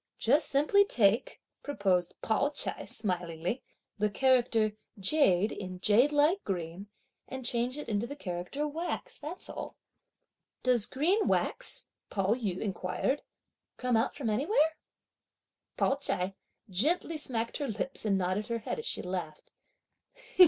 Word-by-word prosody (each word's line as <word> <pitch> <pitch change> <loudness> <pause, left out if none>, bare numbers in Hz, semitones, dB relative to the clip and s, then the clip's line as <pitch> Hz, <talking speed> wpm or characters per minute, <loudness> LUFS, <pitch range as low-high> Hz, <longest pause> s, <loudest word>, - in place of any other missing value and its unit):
"Just 285 +7 +3
simply 305 +9 +5
take," 225 - +2 0.2
proposed 190 -10 0
Pao 225 +6 +2
ch'ai 295 - 0
smilingly, 180 0 -2 0.4
"the 210 0 +2
character 235 -2 +3 0.2
jade 200 - +3
in 185 -2 -6
jade 230 +9 +4
like 300 +7 +3
green 180 +1 -4 0.4
and 260 -1 -6
change 240 +3 +1
it 295 - -6
into 220 +1 0
the 285 - -6
character 185 +7 -3
wax, 325 +4 -4
that's 310 +5 -7
all." - - -6 0.9
"Does 245 -4 +3
'green 360 +11 +2
wax,'" - - +1 0.2
Pao 195 +1 +1
yü 205 -7 -2
inquired, 205 +7 -1 0.6
"come 250 -1 +1
out 225 +2 +1
from 245 -7 -1
anywhere?" 310 - +2 1.0
Pao 270 - +2
ch'ai 185 -8 -1 0.3
gently 300 - +1
smacked 235 -6 -2
her 285 - -2
lips 225 +4 -2
and 200 -3 +2
nodded 185 +3 -1
her 235 - -1
head 230 - -4
as 460 - -5
she - - -2
laughed. 180 -4 -5
230 Hz, 135 wpm, -31 LUFS, 195-285 Hz, 1.0 s, simply